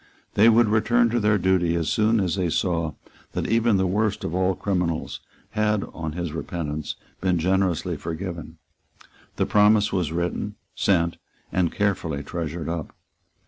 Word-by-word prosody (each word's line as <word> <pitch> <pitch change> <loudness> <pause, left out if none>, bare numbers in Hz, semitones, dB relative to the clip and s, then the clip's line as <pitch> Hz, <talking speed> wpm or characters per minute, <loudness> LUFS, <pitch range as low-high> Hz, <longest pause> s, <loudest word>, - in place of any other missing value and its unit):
They 110 +3 +6
would 115 0 +5
return 115 +2 +3
to 120 - +2
their 105 -1 +3
duty 90 -3 +2
as 85 -2 -1
soon 110 +1 +2
as 90 -4 0
they 90 -3 0
saw 85 -3 0 0.4
that - - -2
even 115 -1 +3
the 95 - +2
worst 105 +3 0
of 80 - -3
all 95 +1 +1
criminals 90 -5 -2 0.3
had, 105 -1 +1
on 80 -2 -4
his 85 -2 -4
repentance, 80 -2 -4 0.2
been 90 -1 +1
generously 95 0 +1
forgiven. 85 -1 -6 0.8
The - - +1
promise 105 0 +4
was 90 -5 0
written, 85 +1 -2 0.2
sent, 85 -3 +1 0.3
and 90 -3 +1
carefully 85 -8 -1
treasured 80 +1 -4
up. 85 -2 -4
90 Hz, 150 wpm, -24 LUFS, 85-105 Hz, 0.8 s, They